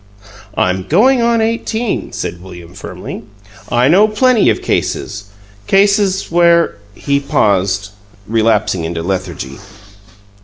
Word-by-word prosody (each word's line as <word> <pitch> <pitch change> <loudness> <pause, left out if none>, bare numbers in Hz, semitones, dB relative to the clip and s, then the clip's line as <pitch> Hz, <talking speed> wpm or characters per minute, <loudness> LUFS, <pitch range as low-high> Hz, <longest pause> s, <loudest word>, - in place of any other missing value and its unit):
"I'm 95 0 +1
going 245 - +4
on 235 -1 +2
eighteen," 225 - -2
said 90 - -5
William, 90 -2 -12
firmly. - - -8 0.5
"I 120 +2 +2
know 190 +8 +5
plenty 230 +2 +3
of - - -1
cases 100 0 -2 0.4
cases 200 -1 +2
where 170 -1 +3
" 105 - -27
He 140 0 +3
paused, 100 -6 0 0.4
relapsing 110 -5 +1
into 80 0 -4
lethargy. 90 -7 -4
125 Hz, 115 wpm, -15 LUFS, -, 0.5 s, know